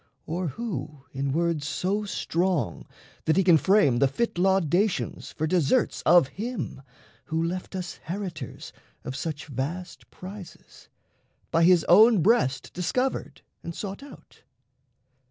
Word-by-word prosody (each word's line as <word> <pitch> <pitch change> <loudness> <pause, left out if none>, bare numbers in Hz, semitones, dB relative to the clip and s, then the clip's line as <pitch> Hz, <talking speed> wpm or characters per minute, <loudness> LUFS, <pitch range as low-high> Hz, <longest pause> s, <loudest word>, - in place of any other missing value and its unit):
Or 175 +2 -2
who 150 - -5
in 135 0 -2
words 165 -1 0
so 200 +6 -1
strong 175 - -1 0.4
that 160 - +2
he 195 - +4
can 170 -3 +6
frame 190 - +4
The 140 - +5
fit 175 - -2
laudations 190 +1 +1
for 155 - -2
deserts 180 - +1
of 175 -6 +6
him 225 - -5 0.4
Who 160 +1 -1
left 180 +3 -4
us 180 -2 -5
heritors 175 - -6 0.3
of 130 - -5
such 155 +1 -4
vast 150 +6 -5
prizes, 190 0 -12 0.6
By 165 0 +4
his 175 -2 +5
own 215 0 +6
breast 135 - +2
discovered 250 +10 -2 0.2
and 170 - -7
sought 200 +2 -6
out? 285 - -15
175 Hz, 130 wpm, -26 LUFS, 155-195 Hz, 0.6 s, can